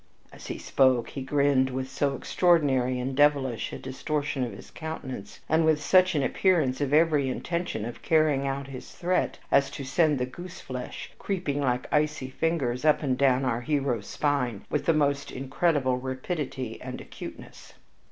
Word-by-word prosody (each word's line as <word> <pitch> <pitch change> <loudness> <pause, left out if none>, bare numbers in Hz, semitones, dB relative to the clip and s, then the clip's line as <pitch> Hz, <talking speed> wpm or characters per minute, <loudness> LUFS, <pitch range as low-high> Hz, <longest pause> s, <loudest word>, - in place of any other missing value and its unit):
As - - -11
he - - -4
spoke 130 -3 +2
he 135 - -6
grinned 135 -1 +2
with 130 0 -3
so 140 +1 -1
extraordinary 135 -7 +2
and 130 +2 -3
devilish 140 -4 +2
a - - -5
distortion 145 +1 -2
of 120 - -3
his 100 - -12
countenance, 130 -10 -7
and 160 +1 +3
with 160 -1 +3
such 185 +3 +4
an 145 - +2
appearance 150 -5 +2
of 140 -1 0
every 150 -3 +4
intention 170 -6 -3
of 120 - -7
carrying 155 -4 +2
out 135 0 -2
his 130 -1 -9
threat 180 +1 0
as 140 0 +4
to 140 - -7
send 150 +2 +2
the 125 - 0
goose 175 +8 -9
flesh 125 -1 -7
creeping 175 -8 -2
like 125 -2 0
icy 150 -3 0
fingers 135 -5 -1
up 155 -1 +3
and 130 -3 +1
down 135 0 +3
our 120 -2 0
hero's 130 -6 -1
spine 125 -8 -1
with 150 - -1
the 165 - +5
most 145 -1 +1
incredible 135 -1 +1
rapidity 130 -1 -4
and 125 0 -6
acuteness. - - -10
140 Hz, 170 wpm, -27 LUFS, 130-155 Hz, -, the